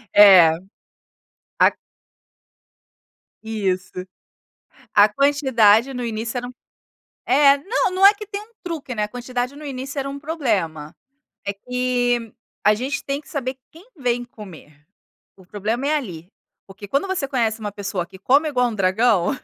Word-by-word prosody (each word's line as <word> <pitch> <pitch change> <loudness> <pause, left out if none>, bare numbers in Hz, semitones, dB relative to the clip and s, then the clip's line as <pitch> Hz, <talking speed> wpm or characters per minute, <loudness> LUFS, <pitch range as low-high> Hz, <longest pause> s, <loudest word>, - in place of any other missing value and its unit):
É. 190 -5 +9 1.1
A - - +6 1.7
Isso. 195 -4 -2 1.0
A 205 0 +7
quantidade 265 -2 +3
no 250 -1 -4
início 230 +1 -4
era 245 0 -4
um 250 - -10 0.7
É, 280 +2 +5
não, 390 - 0
não 380 +1 +5
é 405 - +7
que 420 +1 -9
tem 405 0 -5
um 430 +2 -16
truque, 310 -7 -5
né, 210 - -2
a - - -5
quantidade 245 +2 -4
no 300 +1 -11
início 275 0 -6
era 275 0 -2
um 280 0 -6
problema. 205 - -2 0.5
É 200 - -2
que, 245 0 -1 0.3
a 210 - +5
gente 265 +8 -3
tem 275 +1 -3
que 305 - -21
saber 265 -6 -4
quem 345 +8 -17
vem 245 -3 -1
comer. 165 -10 -14 0.5
O 190 -2 -19
problema 215 +7 -3
é 305 +1 +2
ali. 180 - -6 0.4
Porque, 200 +2 -11
quando 280 - 0
você 370 -7 -1
conhece 230 -5 0
uma 210 -1 -5
pessoa 195 -3 -4
que 190 +1 -15
come 280 +10 +3
igual 250 -3 +1
um - - -6
dragão, 195 0 +2
245 Hz, 155 wpm, -21 LUFS, 205-280 Hz, 1.7 s, É